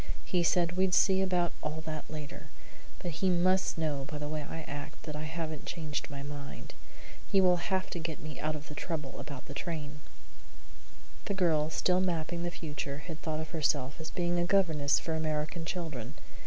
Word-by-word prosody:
"He 180 Hz, -3 st, +2 dB
said 170 Hz, 0 st, +4 dB
we'd 185 Hz, -1 st, +4 dB
see 190 Hz, -1 st, +6 dB
about 180 Hz, -2 st, +2 dB
all 155 Hz, +1 st, -2 dB
that 155 Hz, -1 st, -4 dB
later, 150 Hz, -2 st, -6 dB, 0.5 s
but 175 Hz, -, -3 dB
he 185 Hz, +4 st, +2 dB
must 185 Hz, +1 st, +3 dB
know 150 Hz, -4 st, 0 dB
by 150 Hz, -, -3 dB
the 150 Hz, 0 st, -3 dB
way 155 Hz, 0 st, -2 dB
I 160 Hz, +2 st, -5 dB
act 145 Hz, -1 st, -6 dB
that 150 Hz, -2 st, -4 dB
I 150 Hz, +1 st, -3 dB
haven't 155 Hz, -1 st, -3 dB
changed 155 Hz, -4 st, -2 dB
my 140 Hz, 0 st, -5 dB
mind. 145 Hz, -1 st, -6 dB, 0.6 s
He 195 Hz, -, +6 dB
will 180 Hz, -1 st, +6 dB
have 185 Hz, +2 st, 0 dB
to 175 Hz, -, -2 dB
get 160 Hz, -1 st, -3 dB
me 155 Hz, 0 st, -6 dB
out 155 Hz, 0 st, 0 dB
of 150 Hz, 0 st, -7 dB
the 150 Hz, -, -7 dB
trouble 150 Hz, -3 st, -3 dB
about 140 Hz, -2 st, -6 dB
the 140 Hz, -, -7 dB
train." 150 Hz, -2 st, -3 dB, 1.3 s
The 200 Hz, -, 0 dB
girl, 160 Hz, -4 st, +3 dB, 0.2 s
in 185 Hz, 0 st, +5 dB
mapping 170 Hz, 0 st, -1 dB
the 175 Hz, -, 0 dB
future, 145 Hz, -3 st, -4 dB
had 160 Hz, -3 st, -6 dB
thought 155 Hz, -1 st, -1 dB
of 155 Hz, -, -6 dB
herself 150 Hz, -2 st, +1 dB
as 160 Hz, -, -4 dB
being 175 Hz, 0 st, +1 dB
a -, -, +4 dB
governess 160 Hz, -7 st, +4 dB
for 165 Hz, -, -1 dB
American 155 Hz, +1 st, 0 dB
children. 155 Hz, -, -3 dB
160 Hz, 195 wpm, -32 LUFS, 150-175 Hz, 1.3 s, see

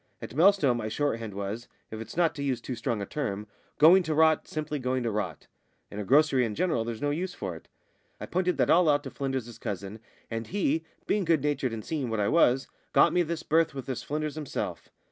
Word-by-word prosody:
At -, -, -8 dB
Melstowe 165 Hz, -3 st, +5 dB
my 115 Hz, -2 st, -3 dB
shorthand 115 Hz, -4 st, -2 dB
was, 100 Hz, +4 st, -4 dB, 0.2 s
if 110 Hz, 0 st, -6 dB
it's 115 Hz, -, -9 dB
not 170 Hz, -2 st, +3 dB
to 145 Hz, -, -6 dB
use 130 Hz, -4 st, 0 dB
too 125 Hz, -, -5 dB
strong 115 Hz, -3 st, -2 dB
a -, -, -4 dB
term, 105 Hz, -6 st, -3 dB, 0.3 s
going 170 Hz, +5 st, +7 dB
to 160 Hz, -3 st, -2 dB
rot, 160 Hz, 0 st, +4 dB
simply 155 Hz, -1 st, -3 dB
going 130 Hz, 0 st, -1 dB
to 115 Hz, -, -1 dB
rot 100 Hz, -7 st, -3 dB, 0.5 s
in 105 Hz, -, -6 dB
a -, -, -2 dB
grocery 135 Hz, +2 st, +4 dB
and 110 Hz, -3 st, -2 dB
general, 160 Hz, -, +1 dB
there's 115 Hz, +2 st, -5 dB
no 145 Hz, -, +1 dB
use 180 Hz, +4 st, -3 dB
for 95 Hz, -4 st, -4 dB
it. -, -, -13 dB, 0.5 s
I -, -, -5 dB
pointed 180 Hz, 0 st, 0 dB
that -, -, +3 dB
all 170 Hz, -1 st, +5 dB
out 145 Hz, 0 st, +3 dB
to 135 Hz, -, -7 dB
Flynders's 130 Hz, -4 st, -4 dB
cousin, 100 Hz, +1 st, -5 dB, 0.3 s
and 115 Hz, 0 st, -3 dB
he 165 Hz, -5 st, 0 dB, 0.2 s
being 205 Hz, -1 st, +1 dB
good 165 Hz, -5 st, +2 dB
natured 140 Hz, -4 st, 0 dB
and 110 Hz, -1 st, -6 dB
seeing 145 Hz, -6 st, -2 dB
what 110 Hz, -1 st, -1 dB
I 100 Hz, -, +2 dB
was 135 Hz, -5 st, +3 dB, 0.3 s
got -, -, +5 dB
me 180 Hz, -, +3 dB
this 170 Hz, -1 st, -3 dB
berth 160 Hz, -2 st, +2 dB
with 135 Hz, -, -5 dB
this 130 Hz, -3 st, -4 dB
Flynders 150 Hz, 0 st, -3 dB
himself. 155 Hz, -3 st, -5 dB
135 Hz, 225 wpm, -28 LUFS, 115-155 Hz, 0.5 s, going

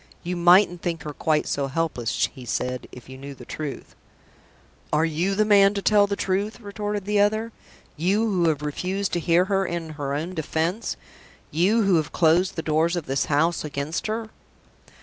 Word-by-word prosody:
"You 180 Hz, +1 st, -3 dB
mightn't 175 Hz, 0 st, +5 dB
think 170 Hz, -2 st, -3 dB
her 150 Hz, -, -6 dB
quite 155 Hz, +1 st, +1 dB
so 140 Hz, -1 st, -1 dB
helpless," 135 Hz, -6 st, -1 dB
he 130 Hz, -, -11 dB
said, 125 Hz, +2 st, -3 dB
"if 125 Hz, -, -12 dB
you 130 Hz, 0 st, -10 dB
knew 140 Hz, 0 st, -8 dB
the 125 Hz, -, -12 dB
truth." 150 Hz, 0 st, -6 dB, 1.0 s
"Are 155 Hz, +2 st, +3 dB
you 170 Hz, +5 st, 0 dB
the 215 Hz, +1 st, +3 dB
man 200 Hz, -1 st, +5 dB
to 200 Hz, -, -1 dB
tell 205 Hz, -1 st, +4 dB
me -, -, -17 dB
the 200 Hz, -, 0 dB
truth?" 200 Hz, +4 st, -1 dB
retorted 205 Hz, -2 st, -4 dB
the 205 Hz, 0 st, +1 dB
other. 215 Hz, +3 st, +1 dB, 0.5 s
"You 195 Hz, +8 st, +2 dB
who 180 Hz, -6 st, +2 dB
have 150 Hz, -2 st, -2 dB
refused 185 Hz, +7 st, -2 dB
to 175 Hz, -, +1 dB
hear 170 Hz, +2 st, +3 dB
her 195 Hz, 0 st, +1 dB
in 170 Hz, -3 st, -4 dB
her 145 Hz, -2 st, -4 dB
own 165 Hz, +5 st, -3 dB
defense! 165 Hz, +5 st, -2 dB, 0.5 s
You 200 Hz, +8 st, +3 dB
who 195 Hz, -3 st, +4 dB
have 155 Hz, -2 st, -1 dB
closed 175 Hz, +3 st, +3 dB
the 160 Hz, -, -3 dB
doors 160 Hz, +3 st, +1 dB
of 170 Hz, -4 st, -3 dB
this 135 Hz, +1 st, 0 dB
house 160 Hz, +4 st, +1 dB
against 150 Hz, +4 st, -3 dB
her!" 220 Hz, 0 st, -3 dB
170 Hz, 190 wpm, -24 LUFS, 150-200 Hz, 1.0 s, mightn't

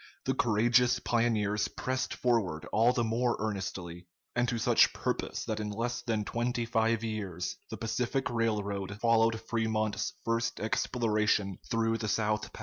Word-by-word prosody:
The 130 Hz, -, +1 dB
courageous 120 Hz, +1 st, +3 dB
pioneers 110 Hz, -4 st, +1 dB
pressed 130 Hz, 0 st, -3 dB
forward 100 Hz, -10 st, 0 dB
all 115 Hz, +3 st, +5 dB
the 125 Hz, -1 st, 0 dB
more 115 Hz, +2 st, +1 dB
earnestly, 90 Hz, -4 st, -4 dB, 0.3 s
and 120 Hz, 0 st, +2 dB
to 120 Hz, -, -1 dB
such 110 Hz, -, +4 dB
purpose -, -, -2 dB
that 110 Hz, -1 st, -2 dB
in 105 Hz, -1 st, -3 dB
less 120 Hz, +4 st, -2 dB
than 110 Hz, -3 st, -1 dB
twenty 120 Hz, +1 st, -1 dB
five 115 Hz, 0 st, +1 dB
years 100 Hz, -6 st, -3 dB
the -, -, -5 dB
Pacific 125 Hz, +3 st, -1 dB
Railroad 100 Hz, -3 st, -1 dB
followed 115 Hz, -1 st, +3 dB
Fremont's 110 Hz, -1 st, -1 dB
first 115 Hz, 0 st, 0 dB
exploration 105 Hz, -3 st, 0 dB
through 115 Hz, 0 st, +1 dB
the 110 Hz, -, -2 dB
South 105 Hz, 0 st, 0 dB
Pass. -, -, -11 dB
115 Hz, 145 wpm, -30 LUFS, 105-120 Hz, 0.3 s, all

